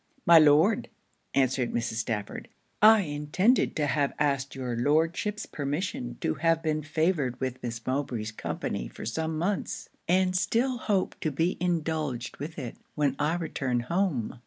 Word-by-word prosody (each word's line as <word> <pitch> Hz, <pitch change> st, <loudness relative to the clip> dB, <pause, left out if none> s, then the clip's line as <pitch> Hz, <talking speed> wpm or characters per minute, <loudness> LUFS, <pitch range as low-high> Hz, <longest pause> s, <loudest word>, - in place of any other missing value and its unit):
'My 170 Hz, -1 st, +9 dB
Lord,' 155 Hz, +8 st, +4 dB, 0.5 s
answered 130 Hz, -2 st, +2 dB
Mrs. 115 Hz, -1 st, -2 dB
Stafford, 110 Hz, -2 st, -3 dB, 0.3 s
'I 215 Hz, 0 st, +8 dB
intended 160 Hz, -, +1 dB
to 150 Hz, -, +1 dB
have 145 Hz, -1 st, +1 dB
asked 140 Hz, -2 st, 0 dB
your 125 Hz, -3 st, -3 dB
Lordship's 165 Hz, -, +1 dB
permission 145 Hz, -, -3 dB
to 80 Hz, -, +1 dB
have 165 Hz, +1 st, +1 dB
been 155 Hz, -1 st, 0 dB
favoured 155 Hz, -4 st, 0 dB
with 130 Hz, -1 st, -3 dB
Miss 115 Hz, -2 st, -5 dB
Mowbray's 130 Hz, -5 st, -2 dB
company -, -, -4 dB
for -, -, -9 dB
some 160 Hz, +7 st, -2 dB
months; 185 Hz, +5 st, -2 dB, 0.2 s
and 185 Hz, +1 st, +2 dB
still 240 Hz, +6 st, +1 dB
hope 200 Hz, -5 st, -1 dB
to 155 Hz, -, -1 dB
be 165 Hz, +5 st, 0 dB
indulged 155 Hz, -7 st, -2 dB
with 155 Hz, +3 st, -7 dB
it 130 Hz, -6 st, -6 dB, 0.2 s
when 145 Hz, -3 st, +1 dB
I 150 Hz, +3 st, +1 dB
return 135 Hz, -7 st, -1 dB
home. 150 Hz, -, -1 dB
150 Hz, 150 wpm, -28 LUFS, 130-170 Hz, 0.5 s, My